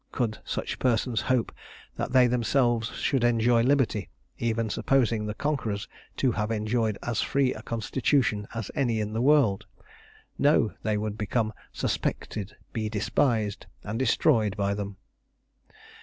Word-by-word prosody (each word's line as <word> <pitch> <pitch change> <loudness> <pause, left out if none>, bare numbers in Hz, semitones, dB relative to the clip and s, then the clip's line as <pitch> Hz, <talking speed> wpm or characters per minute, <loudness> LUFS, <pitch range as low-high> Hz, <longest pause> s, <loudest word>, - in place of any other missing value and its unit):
Could 115 -4 -1
such - - -4
persons 120 -1 +1
hope 130 -3 +1 0.4
that - - -3
they 130 -1 +6
themselves 120 -1 +1
should 135 -4 0
enjoy 120 0 +3
liberty, 125 -6 +1 0.3
even 115 -1 0
supposing 115 -1 +1
the 105 - -4
conquerors 115 -8 -2 0.3
to 130 - +2
have 105 -1 -2
enjoyed 110 -1 0
as 120 -2 -1
free 135 -2 +1
a 110 - -9
constitution 115 -1 0
as 110 -3 -4
any 120 -6 0
in 105 0 -2
the 115 - -1
world? 130 -9 +3 0.7
No; 140 -6 +3
they 110 -1 0
would 105 0 -3
become 110 +1 0 0.2
suspected, 105 -2 -3 0.2
be 110 -1 -2
despised, 110 0 0 0.2
and 110 +3 -4
destroyed 115 -5 +2
by 100 0 +1
them. 100 -1 -5
115 Hz, 140 wpm, -27 LUFS, 105-125 Hz, 0.7 s, they